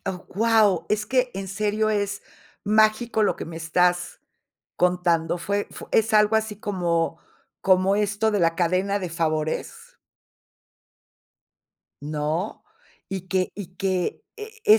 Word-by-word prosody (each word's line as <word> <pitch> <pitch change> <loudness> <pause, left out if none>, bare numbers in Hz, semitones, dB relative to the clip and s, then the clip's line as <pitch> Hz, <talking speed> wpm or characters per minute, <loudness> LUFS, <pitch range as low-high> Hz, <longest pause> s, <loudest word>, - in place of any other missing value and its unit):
Oh, 185 -1 -4
wao, 210 -6 +3
es 210 0 0
que 255 0 +1
en 195 0 -5
serio 215 +2 0
es 205 -2 -1 0.4
mágico 215 +2 +3
lo - - +2
que - - -5
me 165 0 -8
estás, 175 +2 0 0.6
contando. 175 -2 +1
¿Fue 200 +3 -1
fue - - -10
es 225 0 +3
algo 210 +1 +5
así 220 -1 -2
como 170 -5 -1 0.4
como 190 +1 +3
esto 210 +1 +1
de 205 - 0
la 165 -1 +3
cadena 185 +4 +1
de 180 - -3
favores? 155 -2 -3 2.0
¿No? 155 +6 -3 0.5
Y 190 -1 -5
que 185 -1 0
y 185 -3 -9
que 185 -1 -1 0.2
es 435 0 -10
195 Hz, 130 wpm, -24 LUFS, 175-210 Hz, 2.0 s, algo